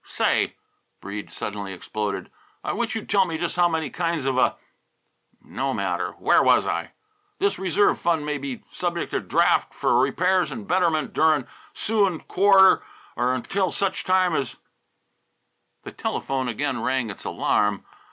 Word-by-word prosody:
"Say," - - 0 0.4
Breede 100 +1 -7
suddenly 100 -2 -5
exploded, 100 0 -4 0.3
"I - - -2
wish 235 +1 -2
you'd 225 - -5
tell 200 -1 +4
me 165 -3 -3
just 170 +1 -2
how 175 -1 +4
many 160 -4 -2
kinds 165 -4 -2
of 135 -1 +1
a 130 - +2 0.9
no - - -3
matter! - - -2
Where - - +3
was - - +4
I? - - -3 0.4
This 400 +1 0
reserve 190 +2 +2
fund 165 -3 0
may 150 -1 -2
be 140 -2 -6
subject 175 -1 -3
to - - 0
draft - - +2
f'r 120 - +2
repairs 180 +7 +1
an' 225 - -6
betterment 175 -5 +1
durin' 155 -4 +3 0.3
'suin' 200 -6 +1
quarter 190 0 +5 0.3
or 120 +1 0
'ntil 190 +9 -1
such 195 -1 -1
time 185 -2 +2
as 135 -5 -2 0.7
" - - -48
The - - -8
telephone 135 -1 -2
again 125 +5 -2
rang 130 -4 0
its 95 - -11
alarm. 105 -1 0
160 Hz, 155 wpm, -24 LUFS, 130-185 Hz, 0.9 s, quarter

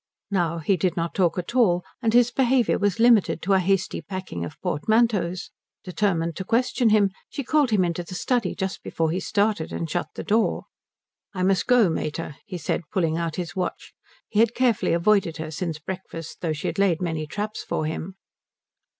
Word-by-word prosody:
Now 170 -4 +1
he 180 +4 +1
did 180 +1 0
not 165 0 -1
talk 175 -3 +1
at 180 +5 -4
all, 180 -8 +4 0.2
and 225 -2 +2
his 240 +1 +4
behaviour 255 -1 +2
was 205 0 0
limited 230 -7 +4
to 195 +3 +2
a 190 - +5
hasty 190 -1 0
packing 185 - -5
of 85 - -8
portmanteaus. 185 +1 +1 0.3
Determined 170 -4 0
to 190 - -3
question 235 +2 +2
him 205 -2 +4 0.2
she 280 - -4
called 295 0 +2
him 200 -5 +3
into 175 0 -2
the 185 +2 -8
study 235 0 0
just 190 -1 -3
before 160 -1 -1
he 180 - -1
started, 205 -4 0
and 165 - -3
shut 175 +3 -2
the - - -5
door. 220 +1 +1 0.7
"I 185 - -1
must 190 0 +2
go 245 -5 +5
mater," 155 -2 -3
he 185 -3 -5
said, 170 - -1
pulling 165 -4 +1
out 165 -2 -2
his 180 +1 -5
watch; 185 -1 -4 0.3
he 210 - -1
had 230 +1 +4
carefully 245 -8 +2
avoided 170 -1 +2
her 155 -1 -5
since 160 0 -3
breakfast 165 -1 -7
though 165 - -1
she 150 - -6
had - - -2
laid 185 -5 +3
many 160 -3 -2
traps 210 +6 -4
for 155 - -2
him. 160 +4 -4
185 Hz, 195 wpm, -24 LUFS, 170-215 Hz, 0.7 s, a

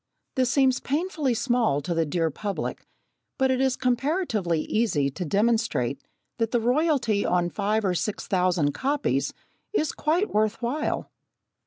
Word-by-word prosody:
This 255 -2 +1
seems 260 -1 +3
painfully 300 -3 -1
small 235 - +1
to 170 +5 -2
the 165 -1 +1
dear 165 +1 0
public, 200 +6 -4 0.5
but 265 0 +2
it 260 0 +1
is 265 -1 +2
comparatively 250 - 0
easy 155 -12 +1
to 180 - -5
demonstrate 200 - +1 0.4
that 225 -1 +1
the 240 - +1
royalty 245 -4 +2
on 175 -1 +1
five 210 +1 0
or 185 - +2
six 200 +4 -2
thousand 180 -6 +2
copies 285 - 0 0.4
is 310 -7 +1
quite 335 +7 0
worth 215 +1 +1
while. 255 +6 -2
225 Hz, 145 wpm, -26 LUFS, 180-265 Hz, 0.5 s, seems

